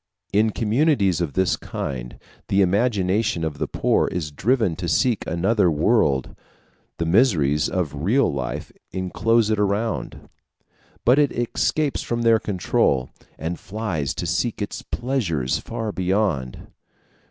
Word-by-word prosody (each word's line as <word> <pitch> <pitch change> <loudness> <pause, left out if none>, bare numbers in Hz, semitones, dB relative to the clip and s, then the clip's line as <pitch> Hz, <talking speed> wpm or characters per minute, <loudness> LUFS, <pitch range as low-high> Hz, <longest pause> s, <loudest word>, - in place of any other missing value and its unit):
In 110 +2 +4
communities 110 - +1
of 80 -5 -2
this 95 -1 +2
kind, - - -6 0.3
the 100 0 +3
imagination 100 -2 +1
of 80 -2 -3
the - - -1
poor - - +1
is 80 -4 -3
driven 110 - +1
to 85 - -4
seek 120 +6 +2
another 95 +4 +2
world; 75 - +2 0.6
the 85 - -1
miseries 80 - +3
of 90 -6 -2
real 115 - +2
life 65 -2 -4 0.2
inclose 110 +4 +1
it 110 - +1
around, 105 +2 -2 0.8
but 125 +5 +5
it 145 -2 +3
escapes 140 +5 0
from 120 0 -2
their 115 -1 +5
control, 90 - 0 0.3
and 85 +3 -4
flies 95 -9 -3
to - - -3
seek - - -1
its - - -4
pleasures 95 - -1
far 110 -2 -4
beyond. 95 - -1
95 Hz, 130 wpm, -23 LUFS, 80-115 Hz, 0.8 s, but